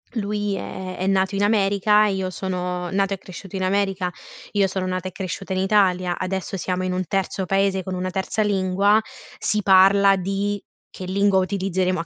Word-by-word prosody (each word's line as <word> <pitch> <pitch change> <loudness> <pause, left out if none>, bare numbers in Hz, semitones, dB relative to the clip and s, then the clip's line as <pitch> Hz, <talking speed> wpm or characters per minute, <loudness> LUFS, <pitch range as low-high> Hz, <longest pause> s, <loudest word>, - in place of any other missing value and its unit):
lui 205 -1 -1
è 185 -1 -6
è 185 - -2
nato 190 0 +2
in 200 - +1
America 205 0 +3
e 200 - 0
io 190 -1 -2
sono 180 -1 -3
nato 195 0 +1
e - - -3
cresciuto 190 +1 -10
in 190 - -2
America, 190 -1 0 0.4
io 200 -2 +2
sono 190 0 -3
nata 185 0 -3
e 185 - -6
cresciuta 190 0 -5
in 185 - -1
Italia, 185 -2 +2
adesso 190 0 -3
siamo 185 0 -2
in 185 0 -1
un 185 0 -1
terzo 195 0 -1
paese, 195 0 +1
con 190 - -5
una 185 0 -2
terza 190 +3 -2
lingua, 200 +1 +2 0.4
si 210 0 0
parla 195 +1 +6
di 195 +2 -2 0.3
che 185 - -8
lingua 195 +1 +2
utilizzeremo 185 -2 0
a 165 - -4
190 Hz, 190 wpm, -22 LUFS, 185-200 Hz, 0.4 s, parla